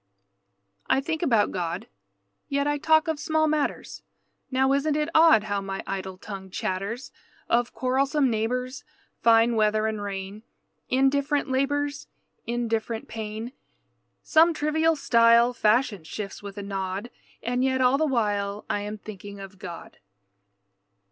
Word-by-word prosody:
I -, -, +4 dB
think 320 Hz, +3 st, -3 dB
about 230 Hz, -11 st, +3 dB
God. 175 Hz, +3 st, -3 dB, 0.6 s
Yet 280 Hz, 0 st, 0 dB
I 290 Hz, 0 st, 0 dB
talk 315 Hz, +1 st, +4 dB
of 320 Hz, -2 st, -1 dB
small 315 Hz, +1 st, +1 dB
matters. 300 Hz, -1 st, -2 dB, 0.5 s
Now 265 Hz, +1 st, +2 dB
isn't 290 Hz, +2 st, +1 dB
it 300 Hz, +1 st, 0 dB
odd 315 Hz, -9 st, +6 dB
How 205 Hz, -2 st, -2 dB
my 195 Hz, 0 st, -5 dB
idle 190 Hz, -1 st, -5 dB
tongue 190 Hz, -1 st, -8 dB
chatters! 195 Hz, +7 st, -4 dB, 0.4 s
Of 240 Hz, 0 st, +1 dB
quarrelsome 270 Hz, +2 st, +1 dB
neighbors, 250 Hz, +3 st, -2 dB, 0.4 s
Fine 230 Hz, 0 st, +5 dB
weather 215 Hz, 0 st, +2 dB
and 220 Hz, -1 st, -2 dB
rain, 200 Hz, +1 st, -5 dB, 0.5 s
Indifferent 275 Hz, +2 st, +1 dB
labors, 290 Hz, +2 st, -1 dB, 0.4 s
Indifferent 230 Hz, -1 st, -2 dB
pain, 220 Hz, +2 st, -5 dB, 0.7 s
Some 325 Hz, +1 st, +4 dB
trivial 315 Hz, +2 st, +2 dB
style 235 Hz, -2 st, +4 dB
Fashion 215 Hz, -, +2 dB
shifts 195 Hz, +5 st, -6 dB
with 200 Hz, 0 st, -9 dB
a 205 Hz, -, -5 dB
nod. 195 Hz, +3 st, -4 dB, 0.3 s
And 245 Hz, +2 st, 0 dB
yet 260 Hz, 0 st, +1 dB
all 260 Hz, +2 st, +3 dB
the 315 Hz, -, +2 dB
while 205 Hz, -5 st, -1 dB
I -, -, 0 dB
am 210 Hz, +1 st, -5 dB
thinking 200 Hz, -1 st, -10 dB
of 195 Hz, 0 st, -10 dB
God. 175 Hz, -4 st, -9 dB
235 Hz, 135 wpm, -26 LUFS, 205-280 Hz, 0.7 s, odd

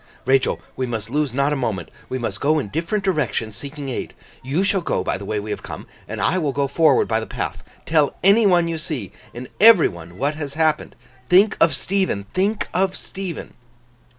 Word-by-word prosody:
'Rachael, 130 Hz, +1 st, +2 dB, 0.2 s
we 130 Hz, -, -2 dB
must 115 Hz, -2 st, -4 dB
lose 150 Hz, -1 st, 0 dB
not 140 Hz, +3 st, +1 dB
a -, -, 0 dB
moment. 110 Hz, -, -3 dB, 0.2 s
We 130 Hz, -, -2 dB
must 115 Hz, -4 st, -4 dB
go 155 Hz, +2 st, +3 dB
in 135 Hz, -9 st, -2 dB
different 170 Hz, -, -2 dB
directions, 150 Hz, -, -1 dB
seeking 140 Hz, +5 st, -6 dB
aid. 125 Hz, -, -5 dB, 0.3 s
You 140 Hz, +8 st, 0 dB
shall 200 Hz, -1 st, +2 dB
go -, -, -1 dB
by -, -, -1 dB
the 100 Hz, -, -7 dB
way 105 Hz, +1 st, -1 dB
we 105 Hz, +1 st, -5 dB
have -, -, -4 dB
come, -, -, -8 dB, 0.2 s
and -, -, -5 dB
I 185 Hz, -, +2 dB
will 145 Hz, -5 st, -1 dB
go 140 Hz, 0 st, 0 dB
forward 150 Hz, 0 st, +3 dB
by 110 Hz, -1 st, +1 dB
the 110 Hz, -, -6 dB
path. -, -, -4 dB, 0.2 s
Tell 155 Hz, -3 st, +2 dB
any 205 Hz, +3 st, +6 dB
one 175 Hz, -3 st, +4 dB
you 165 Hz, -1 st, -3 dB
see, 150 Hz, -, -5 dB, 0.2 s
and 125 Hz, +1 st, -8 dB
every 220 Hz, -5 st, +8 dB
one 85 Hz, 0 st, -11 dB
what 140 Hz, +3 st, 0 dB
has 145 Hz, -2 st, -6 dB
happened. 155 Hz, -1 st, 0 dB, 0.3 s
Think 195 Hz, +4 st, +5 dB
of 165 Hz, -5 st, +5 dB
Stephen, 185 Hz, -, -1 dB
think 205 Hz, +3 st, 0 dB
of 190 Hz, +1 st, +1 dB
Stephen! 185 Hz, -4 st, -7 dB
145 Hz, 205 wpm, -21 LUFS, 120-180 Hz, 0.3 s, every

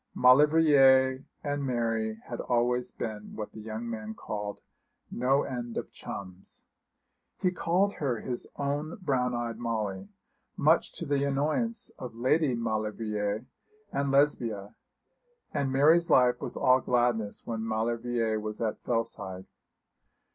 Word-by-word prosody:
Maulevrier 135 Hz, -1 st, +6 dB, 0.2 s
and 145 Hz, -1 st, -2 dB
Mary 115 Hz, -4 st, -1 dB
had 120 Hz, -, -4 dB
always 125 Hz, +1 st, +1 dB
been 105 Hz, -1 st, -6 dB
what 105 Hz, -1 st, -5 dB
the -, -, -10 dB
young 110 Hz, +2 st, -5 dB
man 110 Hz, -1 st, -5 dB
called 105 Hz, -1 st, -5 dB, 0.5 s
'no 135 Hz, +3 st, +2 dB
end 120 Hz, -3 st, -5 dB
of -, -, -4 dB
chums.' 95 Hz, -1 st, -8 dB, 0.8 s
He 180 Hz, -, +2 dB
called 185 Hz, +3 st, +1 dB
her 130 Hz, -6 st, -1 dB
his 125 Hz, -1 st, -4 dB
own 145 Hz, +3 st, -2 dB
brown 130 Hz, -8 st, 0 dB
eyed 115 Hz, -1 st, -3 dB
Molly, 105 Hz, -5 st, -3 dB, 0.5 s
much -, -, +3 dB
to -, -, -5 dB
the 140 Hz, -1 st, +1 dB
annoyance 155 Hz, -, 0 dB
of 125 Hz, -3 st, -7 dB
Lady 130 Hz, +3 st, +2 dB
Maulevrier 110 Hz, -2 st, -2 dB, 0.5 s
and 140 Hz, 0 st, 0 dB
Lesbia; 120 Hz, -8 st, +1 dB, 0.8 s
and 140 Hz, -3 st, 0 dB
Mary's 160 Hz, +6 st, +5 dB
life 125 Hz, -1 st, +4 dB
was -, -, -3 dB
all 130 Hz, 0 st, +4 dB
gladness 120 Hz, -4 st, 0 dB
when 115 Hz, -1 st, -3 dB
Maulevrier 115 Hz, 0 st, 0 dB
was 105 Hz, 0 st, -5 dB
at 110 Hz, -2 st, -2 dB
Fellside. 95 Hz, -5 st, -3 dB
120 Hz, 125 wpm, -29 LUFS, 110-140 Hz, 0.8 s, Maulevrier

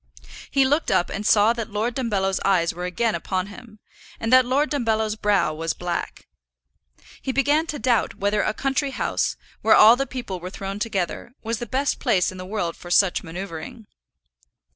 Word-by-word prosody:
He 275 Hz, -1 st, +3 dB
looked 290 Hz, +5 st, +1 dB
up 175 Hz, -, +1 dB
and 205 Hz, +1 st, -3 dB
saw 215 Hz, +2 st, +5 dB
that 230 Hz, -2 st, -5 dB
Lord 220 Hz, +3 st, -1 dB
Dumbello's 195 Hz, -7 st, 0 dB
eyes 175 Hz, -4 st, +2 dB
were 180 Hz, +1 st, -5 dB
again 215 Hz, +5 st, 0 dB
upon 185 Hz, -1 st, -2 dB
him, 230 Hz, -3 st, -13 dB, 0.4 s
and 225 Hz, +2 st, -1 dB
that 255 Hz, -1 st, +6 dB
Lord 285 Hz, +4 st, +1 dB
Dumbello's 220 Hz, -6 st, 0 dB
brow 205 Hz, -7 st, +1 dB
was 165 Hz, +1 st, -2 dB
black. 175 Hz, -1 st, -5 dB, 0.9 s
He 265 Hz, -, -2 dB
began 290 Hz, +4 st, +2 dB
to 300 Hz, -, -4 dB
doubt 245 Hz, -5 st, +1 dB
whether 205 Hz, +1 st, +1 dB
a -, -, 0 dB
country 270 Hz, +5 st, -1 dB
house, -, -, -1 dB, 0.3 s
where -, -, +5 dB
all 220 Hz, +2 st, +8 dB
the 275 Hz, +2 st, -2 dB
people 240 Hz, -8 st, -5 dB
were 180 Hz, +1 st, -6 dB
thrown 195 Hz, +1 st, -6 dB
together, 210 Hz, +2 st, -3 dB
was 230 Hz, 0 st, -2 dB
the 240 Hz, -, -5 dB
best 270 Hz, +4 st, -1 dB
place 195 Hz, -10 st, +2 dB
in 185 Hz, -, -10 dB
the 185 Hz, -, -7 dB
world 185 Hz, -5 st, -2 dB
for 175 Hz, -, -11 dB
such 180 Hz, +1 st, +3 dB
manoeuvring. 190 Hz, +6 st, -7 dB
215 Hz, 185 wpm, -23 LUFS, 185-250 Hz, 0.9 s, all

